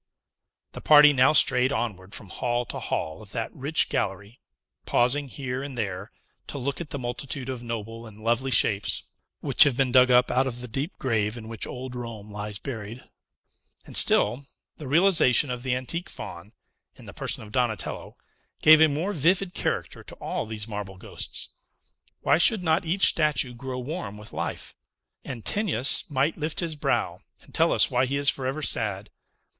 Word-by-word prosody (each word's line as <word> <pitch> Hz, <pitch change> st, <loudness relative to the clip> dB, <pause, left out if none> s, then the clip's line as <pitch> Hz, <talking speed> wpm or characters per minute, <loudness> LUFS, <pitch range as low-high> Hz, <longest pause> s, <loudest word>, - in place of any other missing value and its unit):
The -, -, -9 dB
party 150 Hz, -1 st, +7 dB
now 130 Hz, 0 st, +5 dB
strayed 130 Hz, -4 st, +5 dB
onward 100 Hz, -7 st, -4 dB
from 100 Hz, -, -9 dB
hall 120 Hz, +2 st, -2 dB
to -, -, -6 dB
hall 80 Hz, 0 st, -3 dB
of 105 Hz, -, -14 dB
that 115 Hz, -2 st, -4 dB
rich 145 Hz, +4 st, 0 dB
gallery, 100 Hz, +1 st, -3 dB, 0.5 s
pausing 135 Hz, +4 st, +1 dB
here 130 Hz, -1 st, -5 dB
and 140 Hz, -2 st, -7 dB
there, 100 Hz, -2 st, -4 dB, 0.4 s
to -, -, -6 dB
look 140 Hz, +4 st, -3 dB
at 160 Hz, -, -7 dB
the -, -, -4 dB
multitude 125 Hz, +1 st, -4 dB
of 130 Hz, -2 st, -5 dB
noble 115 Hz, -1 st, -6 dB
and 110 Hz, 0 st, -14 dB
lovely 120 Hz, +3 st, 0 dB
shapes, 105 Hz, -5 st, +1 dB, 0.4 s
which -, -, +1 dB
have 140 Hz, -4 st, +1 dB
been 135 Hz, -2 st, +1 dB
dug 125 Hz, 0 st, +6 dB
up 125 Hz, 0 st, +4 dB
out 130 Hz, +1 st, +2 dB
of 120 Hz, -2 st, -5 dB
the 125 Hz, -, -7 dB
deep 135 Hz, -, -4 dB
grave 110 Hz, -3 st, -1 dB
in 110 Hz, -1 st, -9 dB
which 115 Hz, -1 st, -5 dB
old 125 Hz, 0 st, -7 dB
Rome 115 Hz, -4 st, -8 dB
lies 105 Hz, 0 st, -6 dB
buried. 115 Hz, 0 st, -7 dB, 0.8 s
And -, -, -9 dB
still, 120 Hz, +7 st, +3 dB, 0.3 s
the 150 Hz, -, -8 dB
realization 155 Hz, -4 st, +4 dB
of 125 Hz, -1 st, -4 dB
the 125 Hz, 0 st, -1 dB
antique 150 Hz, +7 st, -4 dB
Faun, 85 Hz, +6 st, -9 dB, 0.4 s
in -, -, -15 dB
the -, -, -10 dB
person -, -, -2 dB
of 105 Hz, -, -12 dB
Donatello, 120 Hz, -4 st, -2 dB, 0.4 s
gave 155 Hz, 0 st, +7 dB
a 160 Hz, -, +8 dB
more 160 Hz, +8 st, -2 dB
vivid 180 Hz, +3 st, +1 dB
character -, -, -3 dB
to -, -, -11 dB
all -, -, -4 dB
these 110 Hz, -1 st, -5 dB
marble 105 Hz, -3 st, -6 dB
ghosts. -, -, -5 dB, 0.7 s
Why 145 Hz, -, +3 dB
should 205 Hz, +1 st, +4 dB
not 160 Hz, +1 st, +1 dB
each 185 Hz, +5 st, +3 dB
statue 145 Hz, -6 st, +2 dB
grow 130 Hz, +1 st, -6 dB
warm 130 Hz, -, -5 dB
with 105 Hz, 0 st, -9 dB
life! -, -, -5 dB, 0.5 s
Antinous 135 Hz, -, +1 dB
might 145 Hz, +3 st, 0 dB
lift 155 Hz, +1 st, -3 dB
his 165 Hz, -3 st, -3 dB
brow, 145 Hz, -, -1 dB, 0.2 s
and -, -, -20 dB
tell -, -, +3 dB
us -, -, +3 dB
why 125 Hz, +1 st, +2 dB
he 140 Hz, +2 st, -1 dB
is 140 Hz, 0 st, +4 dB
forever 135 Hz, +3 st, -4 dB
sad. 105 Hz, -5 st, 0 dB
125 Hz, 180 wpm, -25 LUFS, 110-145 Hz, 0.8 s, a